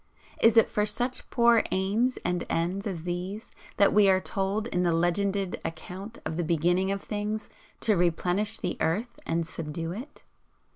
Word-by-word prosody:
Is 225 0 +5
it 225 - +7
for 210 - 0
such 240 +5 -2
poor 235 -1 +5
aims 210 +7 +1
and 180 0 0
ends 180 +5 -1
as 175 -5 -4
these 180 +5 -4 0.3
that 200 - +5
we 210 -2 +6
are 190 -1 +5
told 195 +3 -2
in 180 -6 -1
the 175 -1 +2
legended 190 +3 0
account 190 +7 -7
of 160 - -3
the 175 - 0
beginning 175 +4 +2
of 200 0 -2
things, 210 +1 -3 0.3
to 215 - +3
'Replenish 180 +4 +1
the 180 - -3
earth 210 +10 -1
and 165 0 0
subdue 165 +1 -4
it'? 250 +11 -8
195 Hz, 165 wpm, -28 LUFS, 175-210 Hz, 0.3 s, it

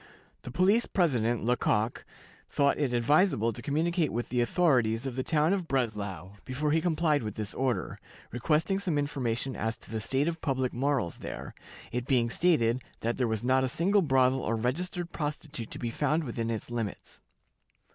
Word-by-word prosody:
The - - -8
police 190 - +3
president, 120 - +1
Lecoq, 115 -1 +1 0.5
thought 140 0 +2
it 140 -4 +1
advisable 120 - +3
to 120 - -9
communicate 160 +3 0
with 120 +1 -3
the 125 0 +1
authorities 120 -5 +2
of 130 -3 -3
the 130 - -1
town 155 +5 +2
of 185 -4 -2
Breslau 105 - -2
before 145 +4 -1
he 160 +1 +3
complied 160 -3 +2
with 105 -3 -5
this 105 -2 -4
order, 125 -8 -1 0.3
requesting 155 - +1
some 180 -6 -1
information 135 -3 -1
as 110 +1 -2
to - - -16
the 110 -1 -2
state 135 +8 0
of 170 -1 -2
public 130 -4 0
morals 130 -7 0
there, - - -7 0.4
it 125 +1 -3
being 120 -3 +2
stated 130 -9 +2 0.2
that 115 +3 -1
there 125 - +2
was 110 -1 -2
not 130 +1 +3
a 130 - 0
single 195 +9 +2
brothel 130 -4 +3
or 115 - -1
registered 170 +9 -2
prostitute 150 -5 -4
to - - -8
be 120 -2 -3
found 150 +6 +1
within 115 -3 -3
its 115 +1 -4
limits. 115 -5 -5
130 Hz, 175 wpm, -29 LUFS, 115-155 Hz, 0.5 s, police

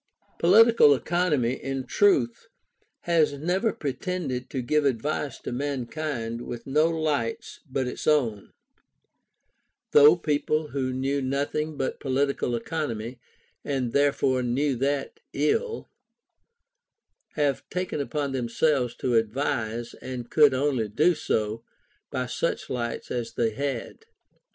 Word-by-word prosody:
Political 210 -4 +6
Economy, 150 -5 +1
in 135 0 -4
truth, 130 - +2 0.5
has 165 -4 +2
never 180 +10 0
pretended 145 -4 -4
to 130 -3 -3
give 150 +5 +2
advice 140 +2 -1
to - - -5
mankind 130 -2 -3
with 120 -1 -7
no 150 +4 +3
lights 155 -8 -2
but 130 0 -1
its 125 - -5
own; 120 -10 +1 1.4
though 150 +3 +8
people 155 -1 0
who 130 -2 -2
knew 135 +2 -1
nothing 145 +3 -2
but 135 - -2
political 135 -2 0
economy 120 -2 -4 0.4
(and 130 -4 -2
therefore 140 -2 +2
knew 130 +3 0
that 145 - -2
ill) 455 +1 0 1.5
have 145 -3 0
taken 180 -5 -2
upon 140 0 -2
themselves 125 +1 0
to 125 - -1
advise, 115 0 -1
and 125 -2 -7
could 145 -4 +5
only 130 -5 0
do 155 - +3
so 110 -7 -2 0.5
by - - -2
such - - -2
lights 120 -2 -4
as 120 -2 -3
they 115 -2 +1
had. 135 - -4
140 Hz, 115 wpm, -26 LUFS, 120-150 Hz, 1.5 s, though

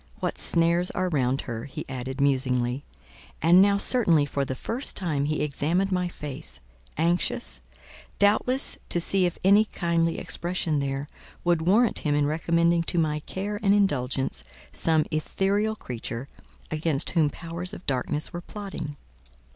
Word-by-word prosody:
"What - - -2
snares 170 +1 +3
are 185 0 -1
round 135 -4 +1
her!" 115 -1 -5
he 135 - -7
added, 130 +1 -5
musingly: 130 -1 +1 0.6
and 175 +4 +6
now, 200 0 +4
certainly 180 - +3
for 140 -1 -2
the 130 -1 -3
first 235 - -4
time, 155 -7 0
he 150 0 0
examined 165 +7 0
my 180 -1 +1
face, 130 - -7 0.4
anxious, 155 - 0 0.6
doubtless, 215 +6 +2
to 175 - +2
see 185 +2 +4
if 175 - -5
any 200 +3 +6
kindly 170 -4 0
expression 170 -3 -2
there, 135 +1 -2 0.4
would 175 -2 +2
warrant 210 +7 +3
him 145 -1 0
in 145 0 +2
recommending 170 +2 +2
to 175 - -2
my 155 -2 +1
care 200 +6 -4
and 200 -1 +4
indulgence 135 -10 +1 0.3
some 160 -2 +2
ethereal 195 +7 0
creature, 120 - -6 0.4
against 155 -2 +1
whom 160 -4 +3
powers 170 +3 -3
of - - -9
darkness 140 +3 -2
were 175 - -4
plotting. 190 -7 -6
165 Hz, 145 wpm, -26 LUFS, 140-185 Hz, 0.6 s, and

